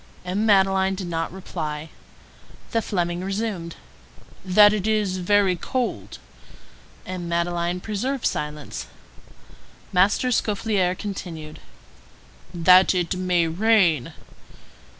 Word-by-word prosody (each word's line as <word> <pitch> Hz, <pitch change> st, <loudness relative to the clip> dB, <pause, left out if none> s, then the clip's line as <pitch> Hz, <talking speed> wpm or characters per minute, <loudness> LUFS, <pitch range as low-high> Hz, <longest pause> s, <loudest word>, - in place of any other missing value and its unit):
M. 200 Hz, +5 st, -1 dB
Madeleine 195 Hz, -1 st, +3 dB
did 190 Hz, -1 st, -5 dB
not 165 Hz, -1 st, -3 dB
reply. 160 Hz, -4 st, -6 dB, 0.8 s
The 230 Hz, -, +1 dB
Fleming 175 Hz, -4 st, -2 dB
resumed:— 195 Hz, -4 st, -3 dB, 0.7 s
"That 205 Hz, +2 st, +6 dB
it 210 Hz, -1 st, -2 dB
is 210 Hz, -4 st, 0 dB
very 190 Hz, 0 st, +2 dB
cold?" 245 Hz, +8 st, -3 dB, 0.9 s
M. 180 Hz, -2 st, -5 dB
Madeleine 170 Hz, +1 st, -1 dB
preserved 240 Hz, +6 st, -3 dB
silence. 150 Hz, -1 st, -3 dB, 1.1 s
Master 195 Hz, +7 st, +3 dB
Scaufflaire 205 Hz, -5 st, 0 dB
continued:— 165 Hz, -7 st, -7 dB, 0.9 s
"That 180 Hz, +2 st, +5 dB
it 175 Hz, -1 st, 0 dB
may 180 Hz, -2 st, +1 dB
rain?" 175 Hz, -, +2 dB
185 Hz, 95 wpm, -23 LUFS, 170-205 Hz, 1.1 s, That